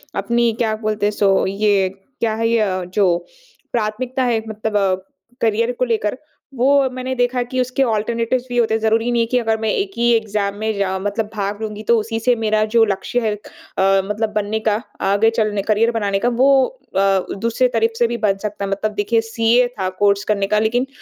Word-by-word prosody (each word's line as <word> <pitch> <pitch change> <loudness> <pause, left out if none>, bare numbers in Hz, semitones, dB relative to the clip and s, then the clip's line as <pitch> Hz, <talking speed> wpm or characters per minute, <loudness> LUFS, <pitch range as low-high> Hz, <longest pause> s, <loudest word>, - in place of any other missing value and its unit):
अपनी 235 +4 +1
क्या 220 -2 +1
बोलते 215 -1 -2
हैं? 210 - +2
सो 195 -2 +2
ये 195 -1 +2 0.3
क्या 225 -2 0
है? 225 +1 0
ये 195 -5 0
जो 185 -4 +3 0.5
प्राथमिकता 240 +4 -1
है 235 -3 +1
मतलब 205 -3 -1 0.4
करियर 230 +2 +1
को 255 - +2
लेकर 225 -1 -1 0.4
वो 250 +2 +2 0.2
मैंने 255 0 -4
देखा 245 0 +1
कि 255 - -1
उसके 255 +2 0
अल्टरनेटिव्स 230 +3 -1
भी 245 - -3
होते 230 -2 +2
हैं। 220 - 0
ज़रूरी 225 +2 +1
नहीं 235 -1 +2
है - - +2
कि 250 - +3
अगर 225 -1 0
मैं 220 - 0
एक 395 - -1
ही 240 0 +2
एग्जाम 210 -3 0
में 220 +1 -1
जाओ 190 -1 -1
मतलब 205 +3 -2
भाग 205 +1 -3
लूँगी 215 0 -5
तो 235 - +5
उसी 225 +1 -3
से 245 +2 +2
मेरा 215 -1 +1
जो 230 - +7
लक्ष्य 205 +4 -1
है 210 - +1
अ, 195 -1 -1
मतलब 210 +2 -1
बनने 210 +1 -1
का 215 +1 +2 0.3
आगे 205 +3 +4
चलने 215 -2 0
करियर 220 +3 +2
बनाने 200 -4 -1
का 240 - +1
वो 265 +2 +4 0.3
अ, 195 0 +3 0.2
दूसरे 230 +3 +1
तरफ़ 225 0 +2
से 235 - +4
भी 235 - -3
बन 205 -3 +1
सकता 205 0 -4
है। 195 - -4
मतलब 215 +2 -1
देखिए 225 +3 +1
सीए 230 +2 +2
था 185 -1 0
कोर्स 200 0 +3
करने 200 -2 0
का 210 +1 +2
लेकिन 240 +4 +1
220 Hz, 205 wpm, -19 LUFS, 205-235 Hz, 0.5 s, जो